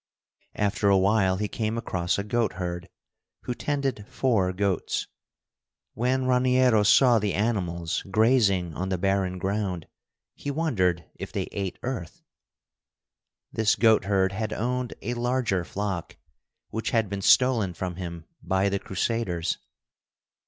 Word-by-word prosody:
After 100 0 +1
a 100 - +5
while 95 -1 +3
he 105 +1 -1
came 110 +2 -2
across 90 -5 -1
a 100 - -1
goatherd, 95 -5 -2 0.5
who 125 - -2
tended 130 -1 -2
four 110 -8 +1
goats. 95 -1 -1 0.9
When 130 +2 0
Raniero 125 -2 +4
saw 120 +3 +5
the 100 -3 -1
animals 90 -6 -1
grazing 100 -6 +3
on 95 +5 -3
the 95 - 0
barren 95 0 0
ground, 95 -2 -2 0.5
he 145 - -6
wondered 95 - 0
if - - -6
they - - -3
ate 95 -2 -3
earth. 120 -10 -5 1.3
This 110 -1 +2
goatherd 100 -4 +3
had 110 +2 -3
owned 125 +2 -2
a 120 - -2
larger 120 -6 0
flock, 95 -1 -4 0.5
which 110 +1 -2
had 110 -2 +1
been 100 0 -4
stolen 115 -5 +4
from 90 0 -4
him 85 -3 -6 0.2
by 95 +1 +1
the 100 0 -1
Crusaders. 95 -4 -2
100 Hz, 130 wpm, -26 LUFS, 95-115 Hz, 1.3 s, a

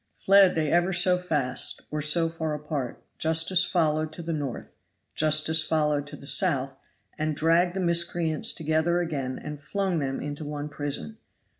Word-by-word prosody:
Fled 195 -1 +5
they 155 -2 0
ever 175 +2 +2
so 180 +1 +5
fast, 150 -8 -2
or 150 0 -2
so 160 +3 +3
far 160 -2 -3
apart, 150 -4 -5 0.2
justice 165 +3 +2
followed 155 -3 0
to 170 - -6
the 165 0 -3
north, 145 -5 -5 0.4
justice 155 +1 +2
followed 150 -2 0
to - - -8
the - - -13
south, 140 -5 +2 0.4
and 155 0 -1
dragged 170 +4 +2
the - - -2
miscreants 170 -2 +1
together 160 +2 +1
again 140 -7 -3
and 150 -1 -8
flung 190 +3 -1
them 135 -2 -2
into 145 +1 -5
one 150 0 -5
prison. 145 +9 -5
155 Hz, 160 wpm, -26 LUFS, 150-170 Hz, 0.4 s, Fled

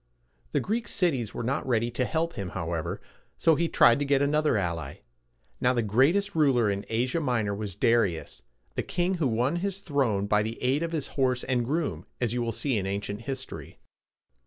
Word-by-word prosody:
The - - +3
Greek 225 +4 -2
cities 135 - 0
were - - -3
not 135 +5 -1
ready 120 -1 +1
to 125 +2 0
help 165 +4 -1
him, 95 -2 -5
however, 85 -2 -3 0.4
so 165 - +4
he 170 +2 +1
tried 120 +2 +5
to - - +1
get 140 -1 +3
another 150 -2 +2
ally. 85 -7 -3 0.6
Now, 125 - +3
the 120 -2 +1
greatest 140 - +2
ruler 130 -9 +3
in 100 0 -4
Asia 125 +8 0
Minor 120 -8 0
was 100 -2 -5
Da 115 - +3
ri´us, 85 -8 -2 0.3
the - - -1
king 180 +1 -1
who 145 - +3
won 125 +7 +1
his 195 +2 -2
throne 135 - 0
by 105 +1 +3
the 110 +2 -4
aid 130 +4 +1
of 170 -1 -2
his 155 -4 -2
horse 130 -2 0
and 125 -2 0
groom, 130 - -2
as 120 -2 0
you 120 - -1
will 115 -1 -1
see 125 0 0
in 95 - -3
ancient 100 +2 -3
history. 135 +2 -6
125 Hz, 200 wpm, -27 LUFS, 105-150 Hz, 0.6 s, tried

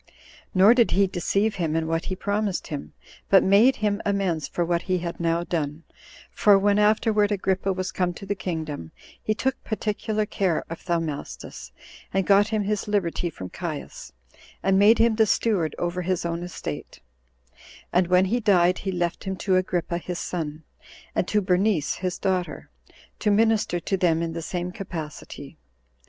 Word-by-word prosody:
Nor 195 +5 +7
did 240 -2 +4
he 200 +1 +3
deceive 195 +3 0
him 160 -3 -1
in 165 0 0
what 165 +1 -1
he 185 - -3
promised 200 0 -2
him, 145 - -6 0.4
but 195 - +6
made 210 +7 +5
him 205 0 0
amends 195 -6 0
for 175 - -1
what 170 0 0
he 185 - +3
had 170 -1 -5
now 170 0 +1
done; 155 -2 -3 0.5
for 205 -2 +5
when 205 +1 +3
afterward 210 0 +3
Agrippa 195 -1 0
was 185 0 -3
come 180 -1 0
to 195 - -9
the 205 - -1
kingdom, 155 - -5 0.3
he 215 - -1
took 265 +4 -2
particular 215 0 -2
care 190 -5 -1
of 165 - -6
Thaumastus, 140 - -4 0.4
and 195 -1 0
got 200 +1 +5
him 215 -1 0
his 210 +1 -2
liberty 180 -4 0
from 95 - -9
Caius, - - -6 0.5
and 195 0 +3
made 210 +3 +6
him 225 -1 +3
the 220 -1 +4
steward 195 -8 +1
over 175 +1 -2
his 180 -1 -1
own 170 0 -2
estate; 175 - -6 0.9
and 180 0 +3
when 180 +1 +4
he 230 +6 0
died, 185 -5 +3
he 195 - -3
left 175 -1 -2
him 190 0 -2
to 190 0 0
Agrippa 175 -2 0
his 180 0 -5
son, 160 -3 -4 0.5
and 180 - 0
to 210 - +2
Bernice 185 -3 +1
his 180 -1 -3
daughter, 185 -2 -2 0.5
to 215 - +1
minister 215 -4 +2
to 195 +3 -1
them 170 -2 +2
in 165 -1 -3
the 165 - -4
same 175 +2 -4
capacity. 155 -5 -8
185 Hz, 175 wpm, -25 LUFS, 170-205 Hz, 0.9 s, Nor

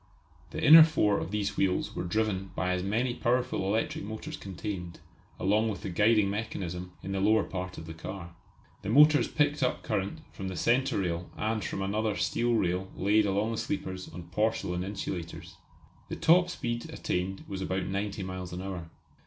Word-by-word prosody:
The - - -5
inner 160 +2 +11
four 105 -10 +2
of 80 +1 -4
these 105 0 -2
wheels 95 -2 0
were - - -2
driven 95 0 -1
by 90 - 0
as 90 0 0
many 115 +6 0
powerful 125 -3 0
electric 110 0 -1
motors 110 +2 -6
contained, 95 -2 -6 0.4
along 105 +4 +2
with 105 - -5
the 95 - -3
guiding 105 +2 +4
mechanism, 90 -4 -4
in 95 - -4
the 95 - -1
lower 110 +3 +4
part 90 -1 -5
of 80 - -7
the 80 - -7
car. 85 +1 -7 0.5
The - - -5
motors 150 +5 +6
picked 145 -1 +1
up 125 - 0
current 100 +12 -2
from 95 - -5
the 95 - -4
centre 125 -1 +2
rail 85 -1 -2
and 110 -1 -1
from 95 +5 -3
another 105 +2 0
steel 120 +3 +1
rail 95 -2 0
laid 105 +2 +3
along 100 +3 0
the 115 - -3
sleepers 95 -11 -4
on 90 +2 -8
porcelain 95 -3 0
insulators. 95 -3 -5 0.5
The - - -3
top 180 +2 +4
speed 120 -8 -3
attained 95 +2 -3
was 95 -1 -5
about 95 0 -1
ninety 100 +1 -3
miles 95 -1 -5
an 90 +1 -5
hour. 90 -4 -6
100 Hz, 180 wpm, -29 LUFS, 90-110 Hz, 0.5 s, inner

